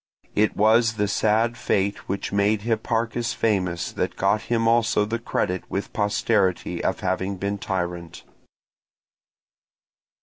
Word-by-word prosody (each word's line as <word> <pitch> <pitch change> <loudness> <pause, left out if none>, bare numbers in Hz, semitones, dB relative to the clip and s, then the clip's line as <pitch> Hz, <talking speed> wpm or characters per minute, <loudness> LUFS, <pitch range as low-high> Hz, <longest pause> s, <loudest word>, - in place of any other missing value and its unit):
It 105 +1 +1
was 110 +2 +4
the 105 -1 0
sad 110 +3 +1
fate 100 -3 -1
which 100 +1 -3
made 100 +1 +1
Hipparchus 115 +1 -1
famous 95 -7 0
that - - -2
got 100 +2 +1
him 115 -1 +2
also 115 -2 +3
the 115 +2 -3
credit 95 -5 -1
with 100 - -4
posterity 105 -2 0
of - - -1
having 95 +1 -1
been 100 +2 -3
tyrant. 85 -3 -4
105 Hz, 125 wpm, -24 LUFS, 95-115 Hz, -, was